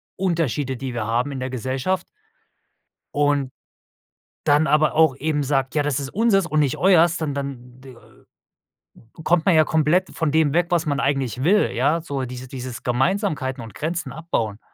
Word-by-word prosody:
Unterschiede, 160 Hz, -7 st, -1 dB
die 130 Hz, -1 st, -6 dB
wir 115 Hz, -2 st, -2 dB
haben 120 Hz, +5 st, 0 dB
in 135 Hz, -, -5 dB
der 130 Hz, 0 st, -4 dB
Gesellschaft.“ 130 Hz, +9 st, -2 dB, 1.1 s
Und, 145 Hz, -2 st, +1 dB, 1.0 s
dann 150 Hz, +2 st, +4 dB
aber 155 Hz, 0 st, +3 dB
auch 155 Hz, -4 st, +4 dB
eben 150 Hz, +1 st, -1 dB
sagt: 135 Hz, -1 st, -1 dB
„Ja, 150 Hz, -, +2 dB
das 145 Hz, -2 st, -1 dB
ist 135 Hz, -1 st, -5 dB
unseres 205 Hz, -2 st, +2 dB
und 155 Hz, -1 st, +1 dB
nicht 140 Hz, -4 st, +1 dB
euers.“ 175 Hz, -3 st, +4 dB
Dann 155 Hz, -4 st, -2 dB
dann 130 Hz, -3 st, -7 dB
d 130 Hz, -2 st, -13 dB, 1.3 s
kommt 165 Hz, 0 st, +2 dB
man 180 Hz, -, +5 dB
ja 155 Hz, -, +6 dB
komplett 160 Hz, +4 st, +1 dB
von 160 Hz, -3 st, 0 dB
dem 155 Hz, -2 st, +2 dB
weg, 175 Hz, +1 st, +2 dB
was 175 Hz, -1 st, +1 dB
man 145 Hz, -2 st, -1 dB
eigentlich 135 Hz, -3 st, -1 dB
will, 205 Hz, +7 st, +3 dB
ja, 150 Hz, +7 st, +1 dB
so 140 Hz, -4 st, -4 dB
dieses 125 Hz, +1 st, -8 dB
dieses 125 Hz, -3 st, -7 dB
Gemeinsamkeiten 135 Hz, -, -1 dB
und 115 Hz, -, -11 dB
Grenzen 160 Hz, -2 st, -3 dB
abbauen. 120 Hz, -8 st, -3 dB
145 Hz, 170 wpm, -22 LUFS, 130-165 Hz, 1.3 s, ja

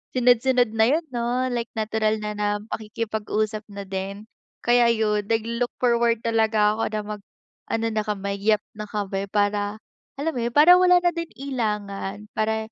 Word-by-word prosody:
Sunod-sunod 245 Hz, -1 st, +3 dB
na 220 Hz, 0 st, +3 dB
yun, 315 Hz, +5 st, +2 dB
no, 245 Hz, +1 st, -1 dB
like 235 Hz, -1 st, -2 dB
natural 220 Hz, 0 st, 0 dB
na 210 Hz, -, -2 dB
na 210 Hz, 0 st, -2 dB, 0.2 s
pakikipag-usap 215 Hz, 0 st, -3 dB
na 200 Hz, -1 st, -7 dB
din. 195 Hz, +2 st, -5 dB, 0.4 s
Kaya 240 Hz, 0 st, +4 dB
yun, 210 Hz, -3 st, +1 dB
naglo-look 230 Hz, +2 st, -1 dB
forward 235 Hz, -1 st, +2 dB
talaga 220 Hz, -2 st, +3 dB
ako 225 Hz, -, -2 dB
na 215 Hz, -1 st, -3 dB
mag-ano 225 Hz, +2 st, -7 dB
na 215 Hz, -1 st, 0 dB
kami, 200 Hz, -1 st, -3 dB
yep 210 Hz, 0 st, +2 dB
na 210 Hz, 0 st, -7 dB
kami, 200 Hz, -1 st, -3 dB
para 205 Hz, 0 st, 0 dB, 0.4 s
alam 305 Hz, +4 st, -1 dB
mo 245 Hz, -, -3 dB
yun? 235 Hz, +2 st, -3 dB
Para 350 Hz, +5 st, +8 dB
wala 360 Hz, 0 st, +6 dB
na 350 Hz, -, +4 dB
din 335 Hz, 0 st, -4 dB
ilangan, 210 Hz, -6 st, -3 dB
para 220 Hz, 0 st, -1 dB
220 Hz, 160 wpm, -24 LUFS, 210-240 Hz, 0.4 s, Para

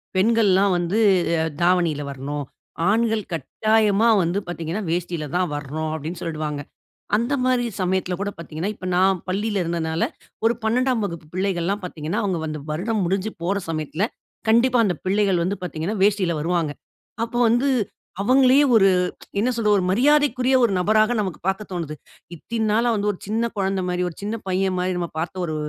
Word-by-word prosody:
"பெண்கள்ல்லாம் 200 Hz, -1 st, +4 dB
வந்து 175 Hz, +4 st, -1 dB, 0.4 s
அ -, -, +1 dB, 0.2 s
தாவணில 170 Hz, -4 st, +2 dB
வரணும். 140 Hz, +2 st, -5 dB, 0.4 s
ஆண்கள் 225 Hz, 0 st, +2 dB
கட்டாயமா 215 Hz, -, +2 dB
வந்து 175 Hz, +3 st, 0 dB
பாத்தீங்கன்னா 170 Hz, +3 st, -4 dB
வேஷ்டில 170 Hz, -2 st, -2 dB
தான் 180 Hz, -3 st, +1 dB
வரணும்", 150 Hz, +2 st, -4 dB
அப்டின்னு 160 Hz, +3 st, -6 dB
சொல்டுவாங்க. 155 Hz, -3 st, -3 dB, 0.6 s
அந்த 235 Hz, +5 st, -1 dB
மாரி 250 Hz, -1 st, +2 dB, 0.2 s
சமயத்துல 185 Hz, 0 st, 0 dB
கூட 205 Hz, 0 st, -2 dB
பாத்தீங்கன்னா, 170 Hz, +4 st, -4 dB
இப்ப 185 Hz, -, -9 dB
நான் 185 Hz, 0 st, +3 dB
பள்ளியில 205 Hz, +1 st, 0 dB
இருந்ததுனால 165 Hz, -1 st, -1 dB, 0.6 s
12ம் 250 Hz, 0 st, +1 dB
வகுப்பு 170 Hz, -5 st, -6 dB
பிள்ளைகள்லாம் 190 Hz, +1 st, -1 dB
பார்த்தீங்கன்னா, 170 Hz, +5 st, -3 dB
அவுங்க 185 Hz, -4 st, 0 dB
வந்து 155 Hz, -2 st, -5 dB
வருடம் 200 Hz, +6 st, -1 dB
முடிஞ்சு 195 Hz, +4 st, -1 dB
போற 195 Hz, +4 st, 0 dB
சமயத்தில, 155 Hz, +3 st, -2 dB, 0.5 s
கண்டிப்பா 240 Hz, +2 st, +4 dB
அந்த 180 Hz, -, 0 dB
பிள்ளைகள் 195 Hz, -3 st, +2 dB
வந்து 195 Hz, +4 st, -1 dB
பார்த்தீங்கன்னா, 175 Hz, +5 st, -3 dB
வேஷ்டில 195 Hz, -5 st, +2 dB
வருவாங்க. 165 Hz, -2 st, 0 dB, 0.5 s
அப்போ 235 Hz, +1 st, -5 dB
வந்து 240 Hz, +4 st, +2 dB, 0.5 s
அவங்களையே 260 Hz, +5 st, +5 dB
ஒரு, 195 Hz, -3 st, +6 dB, 0.5 s
என்ன 240 Hz, +5 st, +2 dB
சொல்றது? 215 Hz, -3 st, +2 dB
ஒரு -, -, -1 dB
மரியாதைக்குரிய 265 Hz, +3 st, +3 dB
ஒரு 230 Hz, -, +3 dB
நபராக 215 Hz, +5 st, +3 dB
நமக்கு 190 Hz, -6 st, -2 dB
பாக்க 190 Hz, +2 st, 0 dB
தோணுது. 165 Hz, -4 st, -4 dB, 0.4 s
இத்தின் 220 Hz, +6 st, -3 dB
நாளா 230 Hz, +3 st, +2 dB
வந்து, 210 Hz, 0 st, 0 dB
ஒரு 185 Hz, -, -9 dB
சின்ன 225 Hz, +3 st, 0 dB
கொழந்த 195 Hz, -1 st, 0 dB
மாரி, 180 Hz, 0 st, -1 dB
ஒரு 165 Hz, -, -12 dB
சின்ன 210 Hz, +3 st, -3 dB
பையன் 190 Hz, 0 st, 0 dB
மாரி, 180 Hz, +1 st, 0 dB
நாம 170 Hz, -1 st, -2 dB
பார்த்த 175 Hz, +3 st, -3 dB
ஒரு 155 Hz, -2 st, -3 dB
190 Hz, 155 wpm, -23 LUFS, 170-220 Hz, 0.6 s, ஒரு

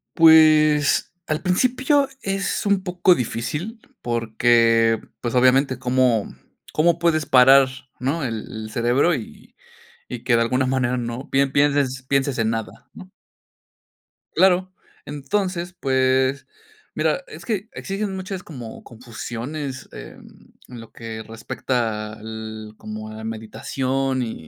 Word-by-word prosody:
Pues, 155 Hz, -2 st, +5 dB
al 155 Hz, 0 st, -2 dB
principio 260 Hz, +9 st, +2 dB
es 195 Hz, +1 st, -2 dB
un 200 Hz, -2 st, +2 dB
poco 180 Hz, 0 st, +3 dB
difícil, 150 Hz, -, -4 dB, 0.2 s
porque, 115 Hz, -1 st, +2 dB, 0.2 s
pues, 120 Hz, 0 st, -3 dB
obviamente, 130 Hz, +1 st, +3 dB
¿cómo, 125 Hz, -4 st, +1 dB, 0.4 s
cómo 170 Hz, +2 st, +2 dB
puedes 160 Hz, -3 st, +2 dB
parar, 135 Hz, +1 st, +7 dB, 0.3 s
no, 140 Hz, +5 st, -1 dB
el 115 Hz, -4 st, -3 dB
el 110 Hz, 0 st, -7 dB
cerebro 125 Hz, +9 st, +2 dB
y 115 Hz, -, -10 dB, 0.5 s
y -, -, -6 dB
y -, -, -14 dB
que 120 Hz, -, +3 dB
de 115 Hz, -, +3 dB
alguna 125 Hz, +3 st, +1 dB
manera 130 Hz, -1 st, 0 dB
no 120 Hz, +2 st, -5 dB
pe 140 Hz, +1 st, +3 dB
pienses 140 Hz, -2 st, +1 dB
pienses 135 Hz, -1 st, 0 dB
en 115 Hz, -, +1 dB
nada, 115 Hz, -1 st, -5 dB
no? -, -, -12 dB, 1.3 s
Claro, 185 Hz, +1 st, +3 dB, 0.3 s
entonces, 175 Hz, +4 st, -3 dB
pues, 130 Hz, 0 st, +1 dB, 0.5 s
mira, -, -, 0 dB
es -, -, -11 dB
que 215 Hz, -2 st, -3 dB
existen 195 Hz, -2 st, -4 dB
muchas 190 Hz, 0 st, -5 dB
como 125 Hz, -11 st, -10 dB
confusiones, 125 Hz, +4 st, -7 dB
mm, -, -, -14 dB, 0.8 s
en 120 Hz, -, -8 dB
lo 115 Hz, -, -14 dB
que 115 Hz, -1 st, -7 dB
respecta 115 Hz, -2 st, -3 dB
al 110 Hz, 0 st, -8 dB
como 110 Hz, 0 st, -7 dB
a 110 Hz, -, -9 dB
la 110 Hz, -, -9 dB
meditación 130 Hz, +4 st, -2 dB
y 115 Hz, -, -4 dB
130 Hz, 130 wpm, -22 LUFS, 115-160 Hz, 1.3 s, parar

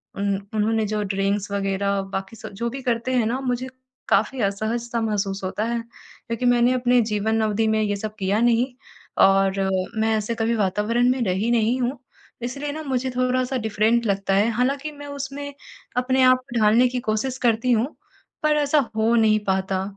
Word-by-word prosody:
उन 200 Hz, 0 st, 0 dB, 0.2 s
उन्होंने 220 Hz, +1 st, +1 dB
जो 210 Hz, 0 st, -1 dB
ड्रिंक्स 195 Hz, +1 st, -1 dB
वग़ैरह 200 Hz, 0 st, 0 dB
बाकी 195 Hz, +3 st, -4 dB
सब -, -, -9 dB
जो 235 Hz, +4 st, -2 dB
भी 270 Hz, +2 st, -6 dB
करते 240 Hz, +1 st, -1 dB
हैं 245 Hz, -3 st, +2 dB
ना, 245 Hz, +4 st, -1 dB
मुझे 250 Hz, 0 st, -2 dB, 0.4 s
काफ़ी 220 Hz, +6 st, +2 dB
असहज-सा 230 Hz, +4 st, -1 dB
महसूस 200 Hz, -3 st, -2 dB
होता 190 Hz, +3 st, -2 dB
है 235 Hz, 0 st, -1 dB
क्योंकि 230 Hz, +1 st, -8 dB
मैंने 245 Hz, 0 st, +4 dB
अपने 250 Hz, -1 st, +3 dB
जीवन 220 Hz, +2 st, +1 dB
अवधि 220 Hz, +1 st, +1 dB
में 220 Hz, 0 st, +2 dB
ये 205 Hz, -1 st, 0 dB
सब 215 Hz, +1 st, -5 dB
किया 195 Hz, +2 st, +1 dB
नहीं 240 Hz, +2 st, +2 dB, 0.5 s
और 195 Hz, 0 st, +3 dB
अ, 190 Hz, 0 st, +1 dB, 0.3 s
मैं 220 Hz, 0 st, +2 dB
ऐसे 215 Hz, +2 st, -2 dB
कभी 230 Hz, +1 st, 0 dB
वातावरण 210 Hz, +5 st, +1 dB
में 255 Hz, -1 st, -1 dB
रही 195 Hz, +5 st, 0 dB
नहीं 235 Hz, +2 st, +2 dB
हूँ 250 Hz, +2 st, -2 dB, 0.4 s
इसलिए 280 Hz, +4 st, -4 dB
ना, 310 Hz, +2 st, -5 dB
मुझे 260 Hz, -2 st, -1 dB
थोड़ा-सा 255 Hz, +1 st, 0 dB
डिफ़रेंट 220 Hz, +1 st, +1 dB
लगता 195 Hz, -1 st, 0 dB
है। 205 Hz, +4 st, +3 dB
हालाँकि 275 Hz, +6 st, -1 dB
मैं 290 Hz, 0 st, -10 dB
उसमें 285 Hz, 0 st, -6 dB, 0.4 s
अपने 260 Hz, +1 st, +2 dB
आप 255 Hz, 0 st, +6 dB
को 240 Hz, -1 st, -1 dB
ढालने 220 Hz, +4 st, +5 dB
की 250 Hz, 0 st, -2 dB
कोशिश 220 Hz, +5 st, -1 dB
करती 230 Hz, +2 st, +2 dB
हूँ 235 Hz, +2 st, +2 dB, 0.6 s
पर 305 Hz, 0 st, +3 dB
ऐसा 295 Hz, +1 st, +3 dB, 0.2 s
हो 220 Hz, +1 st, +2 dB
नहीं 215 Hz, -1 st, +4 dB
पाता 190 Hz, 0 st, 0 dB
225 Hz, 185 wpm, -23 LUFS, 205-250 Hz, 0.6 s, आप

